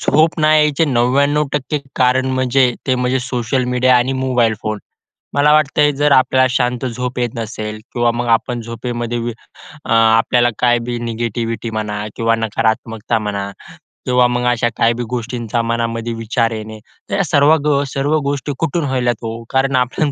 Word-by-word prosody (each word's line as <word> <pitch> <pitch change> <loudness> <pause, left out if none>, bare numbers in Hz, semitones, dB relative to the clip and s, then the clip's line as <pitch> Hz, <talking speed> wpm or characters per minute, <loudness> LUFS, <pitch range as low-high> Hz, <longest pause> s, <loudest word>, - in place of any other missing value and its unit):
झोप 160 +2 +2
नाही 155 0 +5
यायचे 150 +1 +2
99% 140 +2 +1 0.2
कारण 130 0 +2
म्हणजे 130 0 +2
ते 130 - +2
म्हणजे 125 +1 0
सोशल 125 0 -1
मीडिया 125 0 +3
आणि 125 +2 +1
मोबाईल 125 -4 +1
फोन. 110 -1 -2 0.6
मला 145 +1 +4
वाटतं 150 -1 +2
आहे, 150 - +4
जर 145 +1 +1
आपल्याला 130 0 +4
शांत 125 0 0
झोप 125 +1 -4
येत 120 -1 0
नसेल 110 -1 -5
किंवा 120 -1 +2
मग 120 +1 -3
आपण 120 0 -6
झोपेमध्ये 120 +1 -4
व 120 +1 -3 0.6
अ, - - -5
आपल्याला 115 +2 +4
काय 120 -1 +3
बी 120 - -2
निगेटिविटी 115 0 -3
म्हणा 105 -1 -3
किंवा 115 0 +1
नकारात्मकता 115 0 -1
म्हणा 100 -2 -3 0.6
किंवा 125 -1 +3
मग 125 0 -1
अशा 120 0 +1
काही 115 +1 +3
बी 120 - -4
गोष्टींचा 120 -1 -2
मनामध्ये 115 0 -2
विचार 115 +1 -1
येणे. 110 0 -7 0.3
तर - - -1
या 195 - +2
सर्व 145 0 +4
ग 140 -2 +2
सर्व 145 +3 +1
गोष्टी 140 0 -2
कुठून 165 0 -1
होतात 125 -3 0
ओ? 115 +1 -5
कारण 135 0 +1
आपण 130 +4 0
125 Hz, 165 wpm, -17 LUFS, 115-130 Hz, 0.6 s, नाही